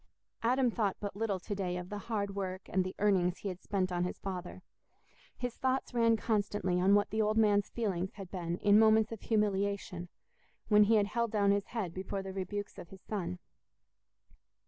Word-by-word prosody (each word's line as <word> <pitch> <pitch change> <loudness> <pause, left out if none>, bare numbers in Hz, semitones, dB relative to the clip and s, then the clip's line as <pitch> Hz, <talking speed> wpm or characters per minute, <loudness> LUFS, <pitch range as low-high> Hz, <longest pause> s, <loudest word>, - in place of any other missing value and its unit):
Adam 250 +1 +2
thought 210 -4 0
but 205 -2 -5
little 205 -3 -1
to 205 +4 -5
day 185 -3 -2
of 180 0 -6
the 205 - -4
hard 200 -1 -2
work 190 -1 -3
and 185 0 +1
the 185 +1 -5
earnings 185 -3 +2
he 200 - -4
had 185 -1 -7
spent 185 -2 -1
on 175 0 0
his 180 - -3
father: 185 -1 -6 0.7
his 245 -1 -3
thoughts 260 0 -1
ran 230 -1 +4
constantly 205 -5 0
on 195 +2 +5
what 205 -1 +2
the 220 +1 +1
old 215 0 +1
man's 205 -2 +3
feelings 190 -5 -2
had 195 -3 -9
been 175 -2 -3
in 205 +1 +6
moments 220 0 +5
of 225 - -6
humiliation, 200 -4 -1 0.6
when 210 -1 +7
he 225 +2 +4
had 210 -2 +4
held 235 +3 -1
down 205 -2 +3
his 200 0 0
head 205 -8 -3
before 190 +1 -4
the 190 0 -6
rebukes 200 +2 -4
of 175 - -10
his 190 -1 -14
son. 180 -4 -3
200 Hz, 195 wpm, -32 LUFS, 185-215 Hz, 0.7 s, when